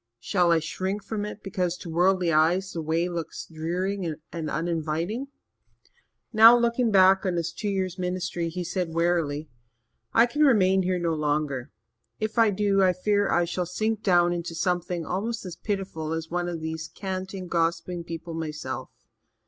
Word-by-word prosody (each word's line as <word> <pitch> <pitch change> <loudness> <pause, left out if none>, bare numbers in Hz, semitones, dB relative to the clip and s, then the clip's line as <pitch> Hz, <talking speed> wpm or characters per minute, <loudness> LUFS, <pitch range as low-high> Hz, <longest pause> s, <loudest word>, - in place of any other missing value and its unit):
Shall 175 - +2
I 165 - +5
shrink 190 +6 -3
from 210 -2 -3
it 210 0 -8
because, 180 -2 -1
to - - -10
worldly 175 +1 +2
eyes, 175 +5 +3
the 165 - -4
way 165 +2 0
looks 170 -2 -5
dreary 175 +2 -3 0.2
and 160 -3 -3
uninviting?" 165 - -2 1.1
Now, 225 +2 +9
looking 235 0 +2
back 190 -1 +5
on 185 -3 0
his 170 -1 -2
two 210 +3 -3
years' 185 -2 -2
ministry, 180 -2 -2
he 180 +2 -4
said 175 -2 -3
wearily: 165 -3 0 0.6
"I 230 - +6
can 290 +5 -2
remain 190 -9 +5
here 185 0 0
no 170 -2 0
longer. 150 -4 -1 0.5
If 215 +1 -1
I 225 -1 +6
do, 200 0 +2
I 185 -1 +4
fear 205 +2 +1
I 175 - +3
shall 175 +1 -2
sink 215 +4 -1
down 175 -3 +4
into 170 -1 -4
something 175 -1 -1
almost 220 +5 -3
as 180 -3 -6
pitiful 190 -7 -3
as 160 0 -4
one 175 0 -1
of 170 -2 -5
these 160 0 -4
canting, 190 0 -4
gossiping 170 +1 -1
people 165 0 -6
myself. 155 -2 -5
180 Hz, 165 wpm, -26 LUFS, 165-195 Hz, 1.1 s, Now